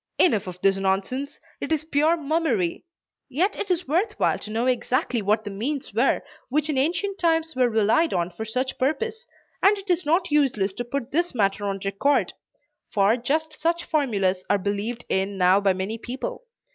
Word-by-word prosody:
Enough 215 - +3
of 180 0 -7
this 195 0 +3
nonsense. 195 +9 -1 0.2
It - - -5
is 310 -1 0
pure 315 +2 +2
mummery. 295 - 0 0.4
Yet 360 +10 +1
it 395 - -4
is 360 -3 0
worth 370 +9 +1
while - - +2
to - - -8
know 225 +3 -1
exactly 250 -1 0
what 210 +2 +1
the 205 - -6
means 265 +8 -3
were - - +2 0.3
which 300 +3 0
in 280 - -2
ancient 385 +7 -1
times 325 -2 +1
were 250 -1 +3
relied 225 +9 +3
on 175 0 -1
for 220 - -6
such 255 +4 -3
purposes, 450 - -1 0.3
and 410 +2 +5
it 395 -1 -3
is 355 0 +1
not 320 +3 +1
useless 245 -10 +2
to 245 - -4
put 250 +1 -4
this 345 0 0
matter 205 -2 +1
on 195 -1 -2
record; 200 +9 +1 0.6
for 200 +2 +3
just 305 +6 -2
such 340 +2 +1
formulas 200 - 0
are 205 - +4
believed 205 +5 -3
in 195 +1 -1
now 185 +2 +4
by 200 -1 +3
many 190 +5 -3
people. 380 - -6
255 Hz, 185 wpm, -24 LUFS, 205-320 Hz, 0.6 s, and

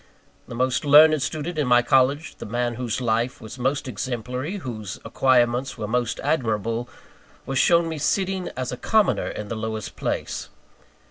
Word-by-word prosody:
The - - -7
most 130 +1 0
learned 150 +1 +7
student 155 +4 -3
in 145 - +1
my 120 0 +5
college 135 +4 +2
the - - -8
man 120 +2 -1
whose 120 -1 -3
life 120 +3 0
was 110 +3 -10
most 135 +2 -1
exemplary, 125 - -4
whose 110 - -6
acquirements 125 0 +2
were 105 -2 -4
most 120 +1 -1
admirable 115 -4 -1 0.6
was 135 -1 -1
shown 170 -1 +4
me 160 -2 -4
sitting, 190 +4 0
as 130 -1 -3
a 125 - -5
commoner, 215 - +2
in 105 - -5
the 115 - -3
lowest 110 -1 -5
place. - - -3
125 Hz, 160 wpm, -24 LUFS, 120-145 Hz, 0.6 s, learned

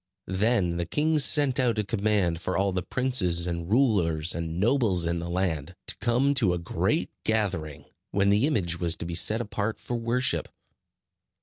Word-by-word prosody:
Then 95 -4 +1
the 85 -1 -3
king 155 - +1
sent 140 -2 +3
out 120 -3 +2
a 105 - +1
command 100 -5 0
for - - -2
all 100 0 +1
the 90 0 -2
princes, 95 -8 0
and 85 -1 -4
rulers, 90 - +2
and 85 0 -4
nobles 105 -6 +2
in 85 0 -1
the 85 +1 -5
land, 85 -2 -2
to - - 0
come 125 +4 +1
to 110 -10 +1
a - - -2
great 85 - -1
gathering, 95 -9 -1 0.2
when 100 0 +1
the 105 +7 +3
image 85 - -1
was 85 -2 +1
to - - -6
be 85 - -5
set 110 +7 +2
apart 105 -1 -3
for - - -6
worship. 120 +2 0
100 Hz, 180 wpm, -26 LUFS, 85-120 Hz, 0.2 s, sent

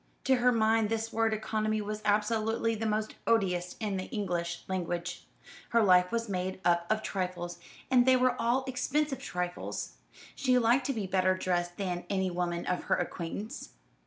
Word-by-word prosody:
To 265 -1 +4
her 250 +1 +4
mind 220 -1 +3
this 225 0 -2
word 225 0 +2
economy 215 0 -1
was 210 0 -4
absolutely 220 +2 +1
the 220 0 -2
most 215 0 -1
odious 180 -6 +1
in 210 -4 -1
the 185 - -3
English 175 -6 -3
language. 175 -1 -3 0.4
Her 230 -1 +4
life 180 -2 +5
was 230 0 -1
made 185 -1 -3
up 170 0 +3
of 215 0 +1
trifles; 180 -2 -3 0.3
and 250 -2 +6
they 260 +1 +5
were 255 -1 +3
all 245 +3 +2
expensive 270 +2 -1
trifles. 180 -8 -4 0.4
She 255 -2 +2
liked 245 +3 +3
to 275 - 0
be 215 -5 -3
better 185 0 +2
dressed 175 -1 -1
than 180 -3 -3
any 190 -2 0
woman 175 -1 -2
of 180 - -2
her - - +3
acquaintance. 175 +4 -5
210 Hz, 170 wpm, -30 LUFS, 180-230 Hz, 0.4 s, and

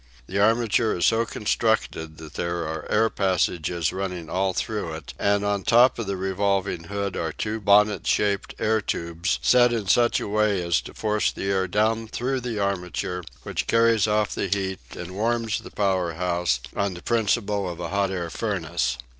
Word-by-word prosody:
The 95 +8 -3
armature 115 0 +2
is 85 - +2
so 115 0 +3
constructed 105 -8 -1
that 80 -1 -11
there 85 -1 -2
are 80 0 -5
air 115 - +3
passages 85 -3 0
running 90 -4 -4
all 95 +1 +1
through 105 -3 -3
it, 80 -3 -9
and 100 0 +2
on 100 -1 0
top 120 +4 +5
of 115 - -3
the 100 -1 -2
revolving 95 -2 -1
hood 100 +1 -3
are 80 -1 -2
two 110 +7 -3
bonnet 105 +1 +4
shaped 100 -2 +1
air 110 0 +1
tubes 85 -1 -2
set 125 -1 +5
in 115 -3 -1
such 120 +4 +4
a - - -4
way 105 -1 +2
as 85 -1 +1
to - - -11
force 105 -2 +1
the 95 - -3
air 95 -1 +1
down 110 +4 +1
through 130 +4 -2
the 120 -3 -4
armature, 90 -2 -2 0.2
which - - -3
carries 115 -2 +4
off 105 0 +1
the - - -2
heat 95 -1 -1 0.2
and 90 +1 -7
warms 115 +1 0
the - - -10
power 95 -4 0
house, 85 -6 0
on 100 -2 -1
the 85 - -10
principle 105 -4 0
of 85 -1 -7
a 85 -1 -4
hot 100 0 +1
air 90 -3 -3
furnace. 85 - -1
100 Hz, 185 wpm, -24 LUFS, 90-110 Hz, 0.2 s, top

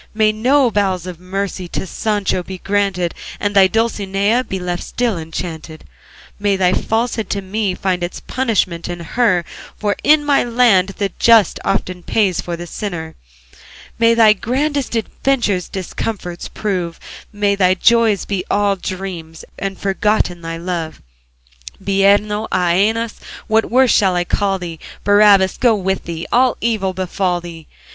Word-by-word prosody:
May 215 -1 +3
no 250 +4 +2
bowels 190 -4 0
of 180 -3 -7
mercy 185 0 -4
To 175 - -4
Sancho 205 -1 -1
be 185 +1 -8
granted, 195 -3 -1 0.3
And 205 0 -2
thy 195 -1 +7
Dulcinea 215 +1 0
Be 190 - -4
left 175 -1 -3
still 240 -4 -1
enchanted, 160 -1 -6 0.6
May 205 -1 +1
thy 185 -1 +2
falsehood 225 +1 -1
to 200 - -1
me 195 0 -2
Find 185 -1 -1
its 175 +1 -4
punishment 200 -10 -1
in 175 -1 -5
her, 180 -1 +1 0.3
For 205 -1 0
in 300 0 +4
my 285 -1 +3
land 230 -6 +3
the 200 -2 -1
just 230 -3 +5
Often 185 -2 -1
pays 190 -1 +1
for 175 -1 -5
the 175 - -7
sinner. 170 -3 -5 0.9
May 230 0 +4
thy 220 -2 +6
grandest 270 +5 -2
adventures 225 -4 -1
Discomfitures 185 -1 -5
prove, 180 -5 -3 0.3
May 205 -1 +1
thy 185 -2 +3
joys 225 0 +3
be 195 -3 -2
all 205 -1 +2
dreams, 180 -4 -6
And 195 -1 -3
forgotten 195 -2 0
thy 165 0 -5
love. 170 -2 -4 0.8
Bireno, 200 +2 +2
Æneas, 205 +6 +1 0.3
what 220 0 +1
worse 255 +1 +4
shall 190 -4 +3
I 175 - +1
call 195 +2 0
thee? 170 -3 -7 0.2
Barabbas 205 -2 +5
go 240 -3 +4
with 190 -1 -2
thee! 165 -1 -5
All 250 0 +3
evil 210 -5 0
befall 185 -1 -1
thee! 170 -2 -10
195 Hz, 150 wpm, -18 LUFS, 180-220 Hz, 0.9 s, thy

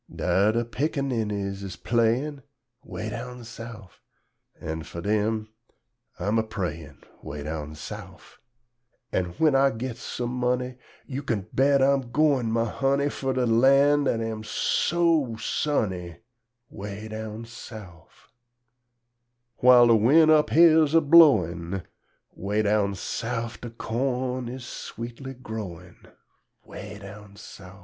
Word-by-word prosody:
Dar 100 +3 +2
de 115 +1 0
pickaninnies 115 -7 -2
's 95 -2 -6
playin', 120 +5 0 0.4
'Weh 110 - -6
down 125 +2 -7
Souf, 115 -3 -11 0.6
An' 80 +1 -4
fur 85 - -8
dem 110 +2 0 0.7
I 90 - -5
am 110 +3 +2
a - - +1
prayin', 85 -8 -6 0.2
'Weh 75 0 -7
down 75 0 -5
Souf; - - -10 0.7
An' 95 - 0
when 155 -3 +3
I 135 0 +5
gits 125 0 -5
sum 120 0 -4
munny, 125 0 -1 0.3
Yo' 135 +1 -5
kin 110 -8 -2
bet 135 0 +4
I'm 135 -2 +2
goin', 135 -5 +2
my 115 0 +1
hunny, 140 +5 0
Fur 135 -2 -2
de 130 -1 +1
lan' 135 +5 +4
dat 115 -3 0
am 110 -1 -4
so 155 +3 +1
sunny, 95 - -2 0.5
'Weh 105 +1 -7
down 110 +1 -6
Souf. 110 -7 -12 1.3
Whil' 125 -1 +8
de 115 -1 +6
win' 150 +9 +5
up 155 -1 +4
here's 160 -2 +5
a 165 - +7
blowin', 95 - +4 0.5
'Weh 105 +3 -1
down 100 -1 +1
Souf 115 +5 -4
De 120 - -6
corn 125 +2 -2
is 125 0 -7
sweetly 120 +4 -7
growin', 100 -8 -8 0.6
'Weh 105 0 -9
down 100 0 -12
Souf. 95 -1 -12
115 Hz, 125 wpm, -26 LUFS, 105-135 Hz, 1.3 s, Whil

